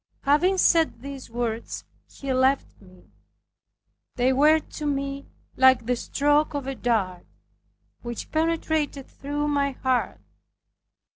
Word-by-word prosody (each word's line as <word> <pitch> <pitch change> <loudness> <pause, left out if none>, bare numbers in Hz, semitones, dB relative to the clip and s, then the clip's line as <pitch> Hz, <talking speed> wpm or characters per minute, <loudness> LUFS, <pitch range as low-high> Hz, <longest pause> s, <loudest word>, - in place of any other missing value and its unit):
Having 330 +7 +3
said 325 -9 +3
these 275 -3 -8
words, 235 -1 -4 0.2
he 275 -1 -4
left 260 -1 +1
me. 185 -2 -19 1.0
They 255 +1 +2
were 300 +4 +5
to 300 -1 -7
me 275 0 -3 0.3
like 260 -2 +5
the 250 +1 +1
stroke 290 +4 +1
of 285 -2 -3
a 270 - -3
dart, 205 -8 -1 0.7
which 240 -1 -6
penetrated 315 -3 0
through 290 +1 -4
my 280 -1 +1
heart. 260 -1 0
275 Hz, 120 wpm, -25 LUFS, 245-295 Hz, 1.0 s, were